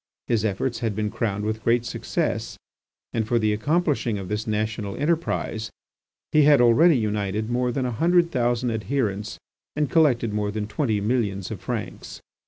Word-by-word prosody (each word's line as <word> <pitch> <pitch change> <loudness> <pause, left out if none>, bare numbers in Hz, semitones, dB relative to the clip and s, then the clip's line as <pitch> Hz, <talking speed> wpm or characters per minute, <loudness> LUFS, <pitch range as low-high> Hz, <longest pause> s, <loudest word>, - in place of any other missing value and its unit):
His 115 -3 +1
efforts 115 +4 -1
had 115 -4 -2
been 105 0 -1
crowned 105 -2 -2
with 110 0 -3
great 120 +1 +2
success, - - -2 0.6
and 110 -1 -1
for 120 - +2
the 110 -2 +2
accomplishing 140 -1 0
of 95 -2 -6
this 105 +2 -2
national 105 -1 -2
enterprise 150 -7 -1 0.6
he 155 - +5
had 145 -1 +6
already 130 +7 +5
united 105 0 -1
more 125 0 +1
than 130 +1 -1
a 125 - -1
hundred 170 +7 +3
thousand 120 -1 0
adherents 110 -1 -2 0.4
and 150 -1 0
collected 125 -9 +3
more 105 -1 -1
than 105 0 -3
twenty 110 0 -1
millions 105 -4 -1
of - - -6
francs. - - -5
115 Hz, 165 wpm, -24 LUFS, 105-130 Hz, 0.6 s, had